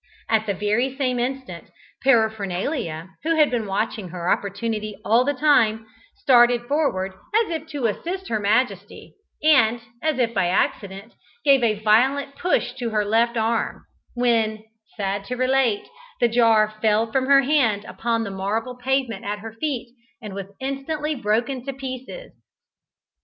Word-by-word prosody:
At 220 Hz, -1 st, +1 dB
the 200 Hz, -, 0 dB
very 215 Hz, +7 st, 0 dB
same 255 Hz, -3 st, 0 dB
instant, 250 Hz, -8 st, -4 dB, 0.4 s
Paraphernalia, 210 Hz, -, 0 dB
who 330 Hz, +2 st, 0 dB
had 305 Hz, -3 st, +4 dB
been 230 Hz, -4 st, -1 dB
watching 200 Hz, -1 st, -2 dB
her 175 Hz, 0 st, -2 dB
opportunity 210 Hz, +1 st, -2 dB
all 230 Hz, +3 st, +4 dB
the 285 Hz, +2 st, -1 dB
time, 230 Hz, -6 st, +3 dB, 0.3 s
started 245 Hz, -9 st, +4 dB
forward 240 Hz, -9 st, 0 dB, 0.2 s
as 450 Hz, -4 st, +2 dB
if 320 Hz, -1 st, -4 dB
to 290 Hz, -6 st, -4 dB
assist 355 Hz, -, -3 dB
her 220 Hz, -, -1 dB
majesty, 220 Hz, +5 st, -1 dB, 0.3 s
and, 240 Hz, -7 st, +4 dB, 0.2 s
as 310 Hz, -3 st, 0 dB
if 235 Hz, -2 st, +1 dB
by 195 Hz, -4 st, +1 dB
accident, 195 Hz, +3 st, -2 dB, 0.3 s
gave 275 Hz, -2 st, +5 dB
a 215 Hz, -3 st, +2 dB
violent 270 Hz, +6 st, +3 dB
push 360 Hz, -, 0 dB
to 240 Hz, -2 st, -2 dB
her 210 Hz, -2 st, 0 dB
left 230 Hz, +3 st, +2 dB
arm, 225 Hz, +1 st, -1 dB, 0.3 s
when, 225 Hz, -3 st, +1 dB, 0.3 s
sad 200 Hz, -1 st, -2 dB
to 250 Hz, -, -4 dB
relate, 255 Hz, -4 st, +1 dB, 0.3 s
the 240 Hz, -, +4 dB
jar 225 Hz, -2 st, +3 dB
fell 220 Hz, +1 st, +2 dB
from 260 Hz, +1 st, 0 dB
her 275 Hz, 0 st, +6 dB
hand 245 Hz, -8 st, +2 dB
upon 230 Hz, -1 st, -2 dB
the 200 Hz, -, -5 dB
marble 215 Hz, +6 st, -3 dB
pavement 255 Hz, -4 st, -1 dB
at 205 Hz, +1 st, -3 dB
her 220 Hz, +1 st, -9 dB
feet, 245 Hz, -2 st, -4 dB, 0.3 s
and 210 Hz, -5 st, -8 dB
was 195 Hz, -1 st, -6 dB
instantly 280 Hz, +3 st, -3 dB
broken 240 Hz, +1 st, -1 dB
in 275 Hz, -1 st, -4 dB
pieces. 265 Hz, -, -7 dB
235 Hz, 150 wpm, -23 LUFS, 215-270 Hz, 0.4 s, her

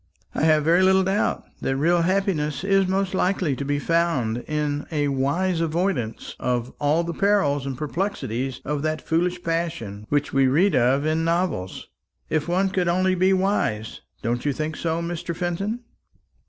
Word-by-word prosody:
I -, -, -2 dB
have 155 Hz, -1 st, +4 dB
very 170 Hz, +4 st, +4 dB
little 190 Hz, 0 st, +5 dB
doubt 195 Hz, +3 st, 0 dB, 0.2 s
that 135 Hz, -, 0 dB
real 170 Hz, +5 st, +3 dB
happiness 170 Hz, -5 st, 0 dB
is 195 Hz, -1 st, +3 dB
most 190 Hz, 0 st, 0 dB
likely 185 Hz, -6 st, +1 dB
to 140 Hz, -, -4 dB
be 145 Hz, +1 st, 0 dB
found 145 Hz, -8 st, +1 dB
in 150 Hz, -1 st, -2 dB
a 145 Hz, -2 st, 0 dB
wise 165 Hz, +7 st, 0 dB
avoidance 165 Hz, -, -2 dB
of 125 Hz, 0 st, -1 dB
all 150 Hz, +3 st, +2 dB
the 170 Hz, 0 st, -4 dB
perils 155 Hz, -9 st, +2 dB
and 135 Hz, -2 st, -4 dB
perplexities 135 Hz, -, -3 dB
of 145 Hz, 0 st, -2 dB
that 155 Hz, 0 st, -2 dB
foolish 175 Hz, +2 st, 0 dB
passion 160 Hz, -12 st, -3 dB
which 145 Hz, 0 st, 0 dB
we 135 Hz, -1 st, +4 dB
read 170 Hz, +10 st, +3 dB
of 130 Hz, +4 st, +3 dB
in 160 Hz, +1 st, +1 dB
novels, 165 Hz, -, -1 dB, 0.4 s
if 155 Hz, 0 st, 0 dB
one 185 Hz, +3 st, +1 dB
could 185 Hz, -2 st, 0 dB
only 185 Hz, +2 st, +2 dB
be 185 Hz, +1 st, +3 dB
wise; 185 Hz, -, 0 dB, 0.2 s
don't 120 Hz, +1 st, -1 dB
you 145 Hz, -, 0 dB
think 155 Hz, +2 st, -3 dB
so, 165 Hz, 0 st, -2 dB
Mr. 170 Hz, 0 st, -4 dB
Fenton?" 195 Hz, +7 st, -2 dB
165 Hz, 165 wpm, -24 LUFS, 140-185 Hz, 0.4 s, little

